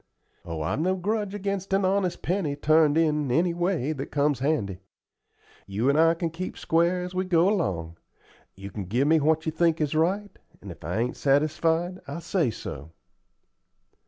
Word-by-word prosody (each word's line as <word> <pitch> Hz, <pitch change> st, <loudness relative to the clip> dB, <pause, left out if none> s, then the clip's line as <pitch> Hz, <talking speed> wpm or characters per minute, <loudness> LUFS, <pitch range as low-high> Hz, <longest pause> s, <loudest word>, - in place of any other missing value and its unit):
"Oh, 80 Hz, -2 st, -4 dB
I've 75 Hz, -, -1 dB
no 185 Hz, +4 st, +1 dB
grudge 205 Hz, +2 st, -2 dB
against 195 Hz, -1 st, -3 dB
an 195 Hz, 0 st, +2 dB
honest 190 Hz, -1 st, 0 dB
penny 170 Hz, -5 st, -1 dB
turned 155 Hz, +1 st, +3 dB
in 150 Hz, -3 st, +1 dB
any 170 Hz, +6 st, +2 dB
way 175 Hz, -4 st, 0 dB
that 135 Hz, -2 st, -5 dB
comes 145 Hz, -2 st, +1 dB
handy. 115 Hz, -, -1 dB, 0.9 s
You 105 Hz, +7 st, 0 dB
and 145 Hz, +2 st, +3 dB
I 165 Hz, +1 st, +5 dB
can 165 Hz, -1 st, -3 dB
keep 180 Hz, +3 st, -6 dB
square 170 Hz, +2 st, +1 dB
as 180 Hz, 0 st, -6 dB
we 185 Hz, 0 st, 0 dB
go 175 Hz, -1 st, +3 dB
along. 85 Hz, -, -1 dB, 0.6 s
You 100 Hz, +1 st, -9 dB
can 100 Hz, -3 st, -5 dB
give 120 Hz, +10 st, +1 dB
me 160 Hz, +1 st, +5 dB
what 160 Hz, +2 st, +1 dB
you 160 Hz, -, 0 dB
think 165 Hz, 0 st, +1 dB
is 150 Hz, -1 st, 0 dB
right, 190 Hz, +6 st, 0 dB, 0.2 s
and 100 Hz, -, -9 dB
if 85 Hz, -, -13 dB
I 85 Hz, +6 st, -3 dB
ain't 120 Hz, +2 st, -1 dB
satisfied, 160 Hz, +5 st, +1 dB
I'll 140 Hz, +4 st, -5 dB
say 170 Hz, -3 st, 0 dB
so." 80 Hz, -7 st, -8 dB
160 Hz, 180 wpm, -26 LUFS, 135-180 Hz, 0.9 s, I